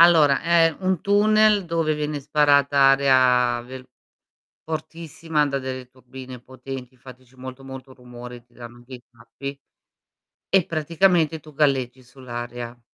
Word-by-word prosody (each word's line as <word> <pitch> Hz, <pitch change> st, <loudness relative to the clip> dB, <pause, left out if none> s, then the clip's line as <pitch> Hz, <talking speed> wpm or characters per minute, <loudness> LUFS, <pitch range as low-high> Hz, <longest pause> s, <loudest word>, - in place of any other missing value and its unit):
Allora, 160 Hz, -5 st, +5 dB
è 165 Hz, -1 st, +3 dB
un 185 Hz, -3 st, -1 dB
tunnel 210 Hz, 0 st, +3 dB
dove 165 Hz, -2 st, -1 dB
viene 150 Hz, -1 st, -4 dB
sparata 145 Hz, -1 st, +2 dB
aria 130 Hz, -3 st, +4 dB
vel 130 Hz, +1 st, -10 dB, 0.8 s
fortissima 160 Hz, -1 st, -3 dB
da 140 Hz, -1 st, -2 dB
delle 130 Hz, -1 st, -6 dB
turbine 130 Hz, 0 st, -12 dB
potenti, 130 Hz, 0 st, -10 dB
infatti 130 Hz, 0 st, -15 dB
c'è 125 Hz, +2 st, -25 dB
molto 130 Hz, +1 st, -10 dB
molto 130 Hz, 0 st, -10 dB
rumore, 125 Hz, -1 st, -11 dB
ti 120 Hz, 0 st, -34 dB
danno 120 Hz, 0 st, -12 dB
dei 125 Hz, -1 st, -11 dB
tappi. 140 Hz, +4 st, -9 dB, 0.9 s
E 195 Hz, -3 st, +3 dB
praticamente 165 Hz, 0 st, +1 dB
tu 155 Hz, 0 st, -16 dB
galleggi 135 Hz, -3 st, 0 dB
sull'aria. 120 Hz, -1 st, -8 dB
135 Hz, 130 wpm, -22 LUFS, 125-155 Hz, 0.9 s, Allora